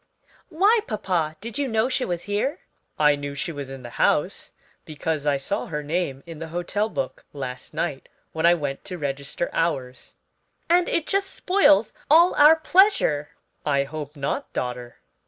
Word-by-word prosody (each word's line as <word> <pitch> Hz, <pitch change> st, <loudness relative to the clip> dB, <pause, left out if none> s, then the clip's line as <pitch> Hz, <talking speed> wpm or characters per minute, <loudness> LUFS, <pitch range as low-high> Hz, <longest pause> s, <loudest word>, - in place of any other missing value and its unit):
"Why, 400 Hz, +8 st, +4 dB
papa; 180 Hz, -8 st, -1 dB
did 230 Hz, +3 st, -5 dB
you 280 Hz, -, 0 dB
know 225 Hz, 0 st, +1 dB
she 255 Hz, 0 st, -1 dB
was 175 Hz, -1 st, -3 dB
here?" 210 Hz, -, -2 dB, 0.4 s
"I 150 Hz, -1 st, +5 dB
knew 145 Hz, 0 st, -6 dB
she 155 Hz, +4 st, -3 dB
was 140 Hz, -3 st, -6 dB
in 135 Hz, -1 st, -9 dB
the 120 Hz, -, -8 dB
house, -, -, +1 dB, 0.3 s
because 155 Hz, -1 st, -3 dB
I 140 Hz, -1 st, +3 dB
saw 200 Hz, +10 st, -3 dB
her 150 Hz, -2 st, -4 dB
name 145 Hz, -3 st, -2 dB
in 165 Hz, -2 st, -9 dB
the 165 Hz, -, -5 dB
hotel 175 Hz, +6 st, -2 dB
book 130 Hz, -, -4 dB
last 130 Hz, -3 st, -6 dB
night 155 Hz, -4 st, -3 dB, 0.2 s
when 160 Hz, +1 st, +1 dB
I 175 Hz, -, +6 dB
went 145 Hz, -4 st, -4 dB
to 180 Hz, -, -6 dB
register 140 Hz, +2 st, -3 dB
ours." 130 Hz, -6 st, -2 dB, 0.5 s
"And 350 Hz, +1 st, +3 dB
it 335 Hz, -, 0 dB
just 395 Hz, 0 st, 0 dB
spoils 360 Hz, -, +3 dB, 0.2 s
all 335 Hz, +4 st, +6 dB
our 300 Hz, +2 st, +7 dB
pleasure." 325 Hz, -, +3 dB, 0.3 s
"I 140 Hz, -2 st, +2 dB
hope 150 Hz, +1 st, -7 dB
not, 140 Hz, -1 st, -3 dB
daughter. 125 Hz, -1 st, -4 dB
165 Hz, 170 wpm, -24 LUFS, 140-225 Hz, 0.5 s, our